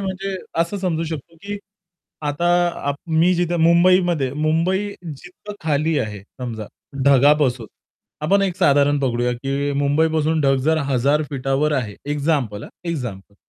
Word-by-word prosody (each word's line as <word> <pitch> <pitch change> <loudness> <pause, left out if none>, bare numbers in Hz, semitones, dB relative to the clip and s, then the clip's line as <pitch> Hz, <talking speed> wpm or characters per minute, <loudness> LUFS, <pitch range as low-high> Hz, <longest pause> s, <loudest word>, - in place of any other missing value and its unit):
म्हणजे 195 0 -3 0.2
असं 170 +5 -1
समजू 165 -3 -1
शकतो, 160 +1 -7
की 205 0 -5 0.7
आता 170 +4 0 0.4
आप 140 - +1
मी 165 +3 +3
जिथे 175 0 0
मुंबईमध्ये, 170 -4 +3
मुंबई 165 +7 0 0.2
जिथं 180 +7 -9
खाली 155 +1 +1
आहे 105 -6 -4 0.2
समजा 115 -4 -5 0.4
ढगापासून 140 -3 +4 0.6
आपण 195 +6 +3
एक 185 -2 -1
साधारण 145 -4 +3
पकडूया, 125 -2 0
की 140 +3 -2
मुंबईपासून 155 +2 +1
ढग 135 -1 +3
जर 160 +1 +3
1000 140 +3 +2
फीटावर 135 +2 0
आहे. 120 -8 -2 0.2
एक्झाम्पल. 140 -8 -1
हा - - -10 0.2
एक्झाम्पल. 120 - -5
150 Hz, 135 wpm, -21 LUFS, 135-170 Hz, 0.7 s, ढगापासून